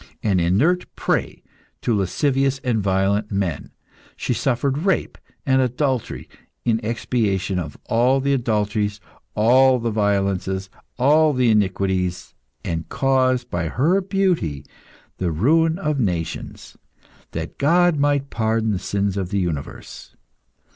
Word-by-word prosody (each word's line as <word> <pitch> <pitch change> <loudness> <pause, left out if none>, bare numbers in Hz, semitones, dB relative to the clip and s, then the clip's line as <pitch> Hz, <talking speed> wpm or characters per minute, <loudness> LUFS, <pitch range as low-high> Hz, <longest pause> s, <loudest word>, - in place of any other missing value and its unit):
An 100 -4 +2
inert 125 - +2
prey - - -2 0.4
to 115 - +1
lascivious 135 - +1
and 115 -4 0
violent 100 +2 0
men, 95 -7 -2 0.5
she - - -2
suffered 135 +3 0
rape 185 +1 0 0.3
and 130 -1 +3
adultery, 130 0 -1 0.4
in 115 -1 +2
expiation 105 -5 -1
of 80 -4 -6
all 125 +4 +2
the 140 +1 +1
adulteries, 105 -4 -1 0.4
all 130 +4 +5
the 115 -1 -2
violences, 100 -2 -1 0.3
all 150 +4 +4
the 125 -3 +3
iniquities, 95 -3 0 0.3
and 80 -1 -3
caused, 130 -2 +1
by 85 -1 -1
her 160 - +2
beauty, 180 - -1 0.5
the 90 -2 -1
ruin 160 - +2
of 150 -6 -1
nations, 90 -8 -3 0.6
that - - -6
God 175 +3 +3
might 140 -1 +1
pardon 110 -1 0
the 95 - -1
sins 100 0 -1
of 95 -3 -2
the 100 - -1
universe. 80 -6 -5
115 Hz, 125 wpm, -21 LUFS, 95-135 Hz, 0.6 s, all